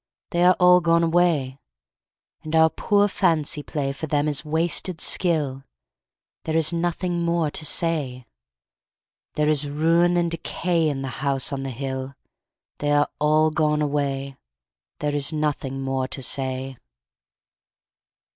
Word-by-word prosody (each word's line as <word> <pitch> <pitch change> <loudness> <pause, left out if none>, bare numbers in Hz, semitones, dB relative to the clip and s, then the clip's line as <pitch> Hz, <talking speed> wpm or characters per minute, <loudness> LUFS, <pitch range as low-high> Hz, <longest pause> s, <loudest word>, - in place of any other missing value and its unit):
They 175 0 +1
are 180 0 +6
all 180 0 +6
gone 170 0 +3
away. 165 -6 +1 0.8
And 155 +1 -4
our 160 0 +5
poor 205 0 +2
fancy 165 -7 +1
play 145 -2 -3
For 150 +3 -6
them 145 0 0
is 145 -2 0
wasted 165 +2 -1
skill: 150 -7 0 0.8
There 160 0 0
is 160 +1 +2
nothing 175 +1 -1
more 170 -3 0
to 155 - -5
say. 140 -7 -1 1.1
There 150 0 +1
is 150 -1 +1
ruin 165 +4 +2
and 170 -1 0
decay 170 0 -1
In 135 -2 -3
the 135 - -4
House 140 0 -1
on 135 - -3
the 135 - -4
Hill 130 +1 -5 0.6
They 145 0 0
are 145 0 +3
all 155 +1 +3
gone 150 -1 +1
away, 140 -2 -2 0.6
There 150 0 -1
is 145 +1 +1
nothing 145 -3 -2
more 135 -1 -1
to 135 - -6
say. 130 0 -1
150 Hz, 140 wpm, -23 LUFS, 135-170 Hz, 1.1 s, are